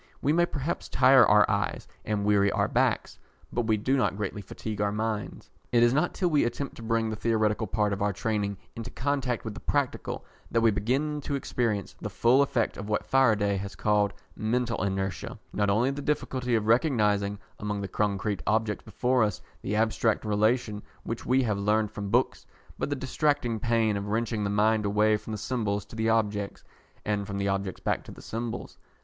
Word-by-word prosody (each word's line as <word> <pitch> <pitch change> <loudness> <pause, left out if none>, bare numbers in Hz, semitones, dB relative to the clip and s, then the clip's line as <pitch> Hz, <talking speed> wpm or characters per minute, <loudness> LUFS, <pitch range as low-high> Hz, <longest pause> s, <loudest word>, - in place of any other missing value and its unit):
We 145 - +2
may 175 +1 +3
perhaps 150 +2 -3
tire 130 0 +6
our 105 0 +6
eyes - - -1 0.2
and 105 -1 -1
weary 100 -1 +4
our - - +1
backs, - - 0 0.3
but 120 -2 0
we 110 -1 +3
do 130 +6 +1
not 125 -7 +1
greatly 105 0 -3
fatigue 105 +2 -5
our 105 -1 +1
minds. 105 -1 -3 0.2
It 120 -1 +5
is 120 +1 +4
not 155 +5 +1
till 180 -2 +1
we 150 - +4
attempt 135 +4 -3
to - - -9
bring 115 -1 0
the - - -2
theoretical 110 -1 +1
part 105 +1 +1
of 100 - -4
our 100 0 +2
training 105 -1 -2 0.2
into 115 +1 -6
contact 130 -3 -1
with 110 - -4
the - - -8
practical 140 -3 -2 0.2
that 115 - +2
we 115 -1 +5
begin 135 +9 0
to 140 - -2
experience 115 -7 -2
the - - -3
full 125 +4 +4
effect 125 -5 0
of 100 +1 -6
what 105 - 0
Faraday 105 -7 +3
has 100 0 -6
called 105 -1 +2 0.2
"mental 115 +1 -1
inertia" 95 -1 -2 0.2
not 105 -1 +1
only 115 +7 +3
the 140 +1 -5
difficulty 130 -4 -1
of 110 -2 0
recognising, 105 -5 +2 0.2
among 105 -1 -3
the 100 - -3
concrete 100 0 -1
objects 110 -1 +1
before 125 +3 +1
us, 105 -4 +1 0.2
the 105 - -2
abstract 110 0 +1
relation 110 +1 +1 0.2
which 115 - -5
we 130 +1 +3
have 105 -4 0
learned 105 +1 +1
from 105 -2 -5
books, - - +1 0.3
but - - -1
the 145 - 0
distracting 135 -3 0
pain 115 -1 +2
of 100 0 -3
wrenching 110 0 -1
the 100 - 0
mind 105 +1 +2
away 105 +1 +3
from 105 - -7
the 110 - -3
symbols 105 -3 -2
to 110 - -12
the 110 0 0
objects, 105 -3 0 0.4
and 100 -1 -1
from 100 - -4
the 100 0 0
objects 95 -1 -2
back - - -1
to - - -11
the - - -12
symbols. 115 +1 -5
110 Hz, 200 wpm, -28 LUFS, 105-120 Hz, 0.4 s, tire